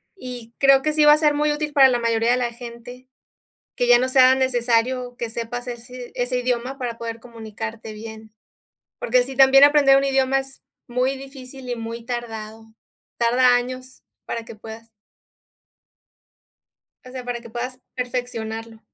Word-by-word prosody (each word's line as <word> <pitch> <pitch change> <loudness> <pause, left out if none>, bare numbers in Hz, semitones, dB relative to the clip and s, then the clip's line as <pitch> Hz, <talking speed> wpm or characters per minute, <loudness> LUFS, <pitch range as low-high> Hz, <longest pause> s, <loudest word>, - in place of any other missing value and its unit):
Y 245 - -9
creo 275 -1 +5
que 305 +2 0
sí 305 0 +3
va 295 - +8
a - - +4
ser 300 -1 +3
muy 300 +1 +1
útil 295 0 -3
para 270 -2 +7
la 245 -1 +1
mayoría 230 0 +1
de 250 - +3
la 240 -1 -1
gente, 245 +1 -11 0.7
que 245 - 0
ya 245 0 +7
no 255 - 0
sea 260 0 +6
necesario 245 -1 0
que 235 -2 -4
sepas 240 +2 -5
ese 245 +1 -8
id - - -22
ese 250 0 -1
idioma 250 +1 -2
para 240 -3 -4
poder 230 0 -6
comunicarte 225 -1 -8
bien. 220 0 -10 0.7
Porque 250 +1 +2
sí, 265 +1 -8
también 270 +1 +7
aprender 285 -2 +6
un 275 - 0
idioma 270 0 +2
es 270 0 -7 0.2
muy 255 +2 -1
difícil 265 -1 -11
y 245 - -2
muy 230 0 -7
tardado. 225 -2 -7 0.4
Tarda 245 +1 +4
años, 255 +1 -6 0.2
para 230 - -5
que - - -10
puedas 225 +1 -11 2.2
o 255 - -11
sea, 255 -1 -7
para 245 -1 -3
que 235 - -12
puedas 250 +2 -5 0.2
perfeccionarlo. 230 -3 -5
245 Hz, 170 wpm, -22 LUFS, 230-260 Hz, 2.2 s, va